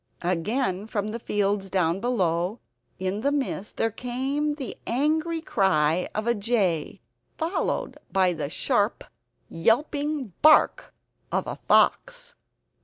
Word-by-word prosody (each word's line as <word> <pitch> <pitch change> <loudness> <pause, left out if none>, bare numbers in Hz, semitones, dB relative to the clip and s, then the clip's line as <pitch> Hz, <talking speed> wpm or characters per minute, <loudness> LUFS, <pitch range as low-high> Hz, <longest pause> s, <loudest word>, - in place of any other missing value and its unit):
Again 190 +3 -1
from 210 -1 -2
the 230 +2 -4
fields 200 -2 0
down 180 -1 +1
below 190 -3 0 0.4
in 190 +3 -2
the 280 +3 +1
mist 270 -7 -3
there 225 - +1
came 270 +6 -2
the 275 -4 -5
angry 315 +6 0
cry 180 - +2
of 215 +1 -1
a 235 - +3
jay, 200 - 0 0.4
followed 330 +4 -2
by 185 -2 +3
the 150 -4 -4
sharp - - 0 0.4
yelping 285 - 0
bark 310 0 +5 0.4
of - - 0
a - - -6
fox! - - +3
220 Hz, 120 wpm, -26 LUFS, 185-285 Hz, 0.4 s, bark